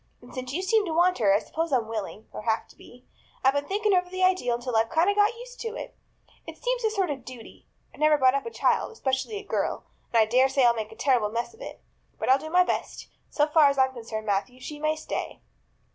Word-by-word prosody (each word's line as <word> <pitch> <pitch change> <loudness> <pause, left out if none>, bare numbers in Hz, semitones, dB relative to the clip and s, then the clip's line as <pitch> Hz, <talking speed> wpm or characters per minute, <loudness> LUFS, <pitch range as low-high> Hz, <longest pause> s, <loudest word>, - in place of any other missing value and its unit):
And 245 - -16
since 255 -1 -5
you 355 +7 -2
seem 430 +3 +3
to 330 - -3
want 355 -2 +3
her, 205 -4 +4
I 200 - +5
suppose 320 +10 -3
I'm 245 -5 +1
willing 215 -1 -6
or - - -7
have 220 0 -1
to - - -18
be. 245 +1 -17 0.4
I've 265 +1 +5
been 285 0 -1
thinking 415 +1 +1
over 360 -1 +2
the 370 0 -2
idea 370 -10 +2
until 240 0 -2
I've 225 +1 +2
got - - -11
kind 400 - +3
of 405 - -5 0.2
used - - -11
to 455 0 -5
it. - - -7 0.5
It - - -8
seems - - -2
a 440 - +3
sort 390 -6 -1
of 270 -3 -6
duty. 250 -2 -12 0.3
I've - - -16
never 305 0 +4
brought 260 -2 +4
up 275 +10 -2
a - - -3
child, - - +1
especially 270 +2 -2
a 415 - -7
girl, 405 - -2 0.3
and 235 - +2
I 220 - +6
dare 255 +4 +3
say 265 -1 +3
I'll 235 - +6
make 220 -2 -5
a - - -11
terrible 240 -3 +2
mess 230 +2 -3
of 450 - -18
it. - - -9 0.4
But - - -3
I'll 265 +1 +6
do 315 - -7
my 360 +2 +5
best. - - -4 0.2
So 295 - +2
far 300 -1 +5
as 280 - -2
I'm 260 0 +3
concerned, 225 -3 -6
Matthew, 210 +5 -1
she 295 +3 -8
may 310 +1 0
stay." 315 - -5
270 Hz, 260 wpm, -26 LUFS, 240-360 Hz, 0.5 s, I